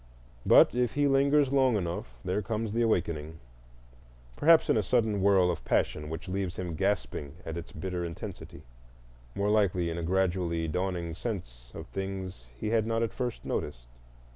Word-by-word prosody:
But - - +7
if 125 -1 0
he 145 0 +3
lingers 140 0 +3
long 130 -3 +4
enough 85 - -3
there 95 +3 0
comes 110 +1 -3
the 115 +2 0
awakening: 85 -8 0 1.0
perhaps 165 +1 +5
in - - +3
a 110 - +3
sudden 110 -1 +1
whirl 95 -2 +4
of 85 - -5
passion 75 0 0
which 80 +3 -6
leaves 95 -1 -2
him 90 -2 -4
gasping 90 -5 -2
at 80 - -5
its 85 0 -7
bitter 90 +2 -4
intensity; 85 -1 -7 0.7
more 100 +1 +1
likely 90 -5 +2
in 85 - -3
a - - -3
gradually 85 -2 0
dawning 90 0 -2
sense 70 - -6
of - - -7
things 95 -8 -6
he 105 - -3
had 110 -1 +2
not 115 0 +1
at 115 - -2
first 125 -2 -4
noticed. 60 -5 -3
95 Hz, 165 wpm, -29 LUFS, 85-110 Hz, 1.0 s, But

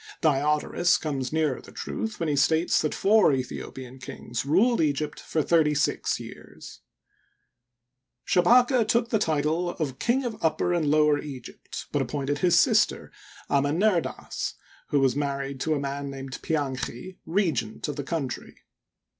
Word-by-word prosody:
Diodorus 150 +3 +2
comes 135 -5 -3
nearer 155 -4 0
the - - -14
truth 220 -1 -5
when 165 - -1
he 150 - +1
states 160 +5 +3
that 155 - -1
four 210 +1 +4
Aethiopian 130 0 -5
kings 120 0 -5
ruled 210 - +3
Egypt 150 -1 -1
for 155 - -1
thirty 155 -2 +3
six 150 - 0
years. - - -11 1.5
Shabaka 240 +5 +4
took 230 +1 +2
the 220 - +2
title 160 0 0
of 145 -6 -4
King 255 +3 +1
of 230 -6 -5
Upper 165 +2 +1
and 160 -4 +1
Lower 150 -1 +4
Egypt, 135 -5 -8
but - - +1
appointed 145 0 -2
his 175 0 +4
sister, - - +2 0.4
Amenerdas, 165 +7 0 0.3
who 145 - +2
was 135 -2 +2
married 140 -1 -3
to 155 +3 0
a - - -1
man 140 0 -4
named 135 -1 -7
Pianchi, 145 +2 -3
regent 160 - -1
of 145 - -3
the 145 - -4
country. 140 -4 -4
150 Hz, 145 wpm, -26 LUFS, 140-175 Hz, 1.5 s, four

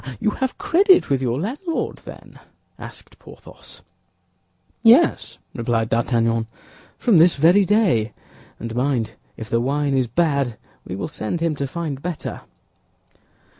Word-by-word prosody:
"Ah, 130 - -7
ah! - - -14
You 215 - +1
have 260 +4 -3
credit 375 - +3
with 135 -1 +1
your 125 0 -1
landlord, 290 - -3
then?" - - -12 0.4
asked - - -12
Porthos. - - -14 1.0
"Yes," 245 +9 +4 0.2
replied 115 -1 -1
D'Artagnan, 115 -1 0 0.5
"from 220 -9 +3
this 170 +2 +5
very 175 +7 +4
day; 185 - +2 0.5
and 115 0 -6
mind, 125 -4 0 0.3
if 110 - -7
the 115 +1 0
wine 140 +2 0
is 130 -2 +1
bad, 140 -3 0 0.3
we 90 - -6
will 100 - -4
send 150 0 -4
him 165 -1 0
to 140 -1 -3
find 150 -2 -5
better." 175 -1 -5
140 Hz, 140 wpm, -21 LUFS, 115-180 Hz, 1.0 s, this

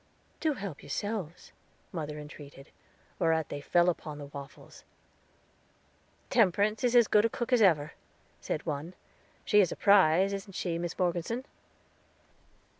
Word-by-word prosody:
"Do 310 -2 +1
help 195 - -7
yourselves," 205 -6 -5 0.4
mother 150 -3 -5
entreated, 145 -1 -11 0.5
whereat 160 -3 +1
they 145 - -5
fell 175 +4 +3
upon 155 -4 -2
the 145 - -8
waffles. 140 0 -11 1.5
"Temperance 210 +1 +2
is 245 0 +2
as 235 -3 +6
good 210 - +4
a 230 - +2
cook 240 +2 -3
as 245 - +4
ever," 155 -7 +3 0.5
said 155 - -4
one; 155 +3 -4 0.5
"she 210 - +4
is 180 - +1
a - - -3
prize, 195 -1 +4
isn't 195 0 -6
she, 170 -2 -2
Mis 175 -1 -4
Morgeson?" 180 +8 -1
175 Hz, 135 wpm, -30 LUFS, 155-205 Hz, 1.5 s, as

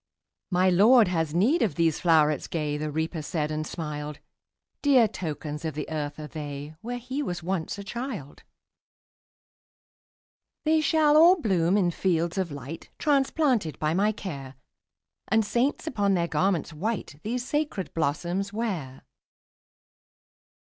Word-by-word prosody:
``My 180 0 +3
Lord 220 +2 +6
has 160 -3 -1
need 250 - +3
of 190 -10 +1
these 165 -2 +2
flowerets 155 -4 +3
gay,'' 150 -3 -2
The 150 +1 -3
Reaper 160 +2 -2
said, 150 -1 -2
and 155 0 -3
smiled; 150 -2 -5 0.6
``Dear 265 -6 +5
tokens 150 -2 -5
of 160 -3 -3
the 150 - -4
earth 145 -2 -3
are 155 - -6
they, 145 -1 -6
Where 245 +2 -4
he 255 +4 -4
was 175 - -4
once 180 0 -2
a 200 - -6
child. 210 - -6 2.2
``They 315 0 +4
shall 305 -1 +4
all 345 +4 +7
bloom 190 - +2
in 180 -4 +2
fields 170 0 0
of 180 -4 -1
light, 140 +3 -8
Transplanted 270 - +1
by 155 +1 0
my 205 +4 +2
care, 140 -11 -7 0.7
And 220 +1 +2
saints, 240 +9 0
upon 205 -10 +1
their 170 -1 +1
garments 170 0 0
white, 185 -3 -3
These 245 +3 -3
sacred 295 -11 -2
blossoms 175 +6 -1
wear.'' 185 - -4
175 Hz, 140 wpm, -27 LUFS, 155-225 Hz, 2.2 s, all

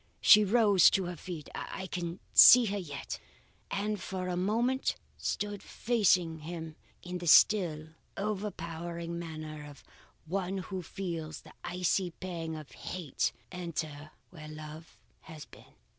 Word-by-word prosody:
She 210 0 +8
rose 205 -3 +5
to 195 - +1
her 175 0 -5
feet 165 -2 -8
I 190 - -5
can 175 -1 -4
see 250 -1 +10
her 205 -1 -2
yet 145 -6 -6 0.5
and 205 0 -2
for 185 -1 -4
a 180 - -1
moment 230 +8 0 0.2
stood 205 -1 -3
facing 185 -9 +1
him 160 0 -7 0.3
in 180 0 -5
the 175 - -6
still, 160 -3 +5 0.3
overpowering 170 -5 -4
manner 155 -2 -7
of 140 -2 -14 0.4
one 190 +3 -2
who 190 0 -5
feels 165 -4 -5
the - - -16
icy 180 +1 0
pang 165 -2 -6
of 155 -2 -9
hate 175 -7 -3 0.2
enter 155 -4 -5 0.2
where 155 -4 -10
love 155 +1 -10 0.3
has 155 -4 -10
been. - - -18
175 Hz, 135 wpm, -31 LUFS, 160-195 Hz, 0.5 s, see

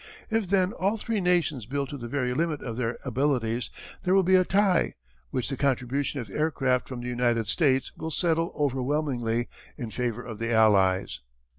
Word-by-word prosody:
If 220 -4 0
then 190 0 +2
all 200 +1 0
three 220 -1 -2
nations 170 - +1
build 140 0 -2
to 145 - -5
the 120 - -6
very 125 -1 -1
limit 155 +1 -1
of 115 -3 -4
their 120 -1 -2
abilities 125 -3 0 0.3
there 185 +1 +2
will 195 - +5
be 185 +1 +2
a 185 0 +7
tie, 195 -1 +2 0.3
which 125 - -2
the 135 - -2
contribution 135 +1 0
of 115 - -5
aircraft 130 +1 0
from 125 -2 -5
the 120 - -5
United 120 -2 +1
States 135 +1 +1
will 160 - -5
settle 165 +1 +1
overwhelmingly 130 -4 0 0.3
in 115 -3 -5
favour 125 0 -2
of 110 -3 -7
the 115 0 -1
Allies. 95 - +3
130 Hz, 180 wpm, -27 LUFS, 120-165 Hz, 0.3 s, a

